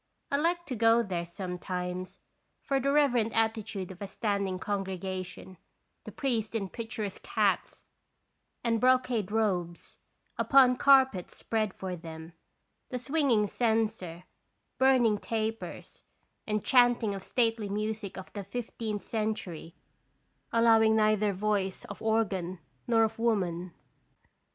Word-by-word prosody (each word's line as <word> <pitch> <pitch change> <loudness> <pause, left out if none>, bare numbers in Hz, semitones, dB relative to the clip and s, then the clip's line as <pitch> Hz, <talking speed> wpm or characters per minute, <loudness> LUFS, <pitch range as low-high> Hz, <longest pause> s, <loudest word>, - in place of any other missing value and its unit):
I 280 - +3
liked 345 +3 0
to 255 - -2
go 230 +1 +4
there 175 -4 -3
some 180 +1 -6
times, 180 0 -4 0.5
for 275 -1 +1
the 275 +2 +1
reverent 245 -6 +3
attitude 220 -4 -1
of 185 - -12
a 200 - -4
standing 200 -2 -1
congregation, 185 -1 -4 0.5
the - - -7
priests 230 -5 -2
in 195 -4 -2
picturesque 220 -3 -5
hats - - 0 0.8
and 230 -2 +1
brocade 250 -5 +2
robes, 185 -6 -1 0.4
upon 260 -2 +6
carpets 265 -10 +4
spread 215 -3 -1
for 185 -1 -5
them, 160 -1 -9 0.6
the 250 - -3
swinging 255 -4 +2
censer, 215 -6 -1 0.6
burning 250 -5 +4
tapers, 225 0 -4 0.5
and 210 -1 -1
chanting 245 -4 +4
of 195 -1 -6
stately 225 -3 0
music 210 -1 -3
of 190 - -9
the 205 - -5
fifteenth 215 0 -4
cen 220 -1 -1
tury, 165 -4 -8 0.8
allowing 225 -1 +5
neither 215 -1 +3
voice 195 -1 -1
of 200 - -9
organ 195 -5 0 0.3
nor 230 -2 +4
of 220 0 -1
woman. 185 -6 0
215 Hz, 125 wpm, -29 LUFS, 190-230 Hz, 0.8 s, upon